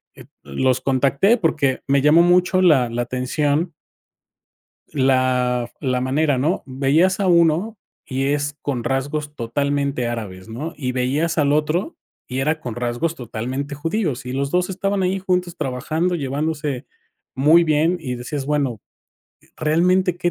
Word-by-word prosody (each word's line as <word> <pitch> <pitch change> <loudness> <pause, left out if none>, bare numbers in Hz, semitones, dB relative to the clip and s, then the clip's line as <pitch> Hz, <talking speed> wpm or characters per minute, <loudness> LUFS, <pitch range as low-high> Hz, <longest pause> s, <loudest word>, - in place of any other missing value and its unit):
eh, - - -12 0.2
los 125 - 0
contacté 140 - +3
porque 150 - 0
me 140 0 +3
llamó 150 +4 +6
mucho 180 +1 +3
la 140 -9 +4
la 120 +1 -2
atención 145 +6 -1 1.2
la 130 -3 +2
f - - -31
la 125 -1 +1
manera, 135 +2 +1
¿no? 155 +8 0
Veías 145 +9 +2
a 195 - +1
uno 170 +5 +3 0.3
y 135 +1 -1
es 145 0 -1
con 130 -5 -3
rasgos 145 +3 -2
totalmente 140 +1 -1
árabes, 105 -4 -6
¿no? 145 +9 -5
Y 125 -4 -3
veías 140 +7 0
al 145 -2 +2
otro 155 - 0 0.3
y 130 - -4
era 155 +4 0
con 120 -3 -5
rasgos 120 +7 -2
totalmente 130 +3 -5
judíos, 150 - -2
y 125 - -4
los 140 +1 -2
2 180 +3 +1
estaban 195 +1 -1
ahí 185 +1 0
juntos 180 -2 -1
trabajando, 155 +7 -1
llevándose 145 -2 -2 0.5
muy 155 +6 +5
bien, 160 +3 +2
y 130 -6 -4
decías: 135 +3 -5
"Bueno, 140 -7 -1 0.8
realmente 175 +3 +2
qué 175 0 0
145 Hz, 150 wpm, -21 LUFS, 130-165 Hz, 1.2 s, llamó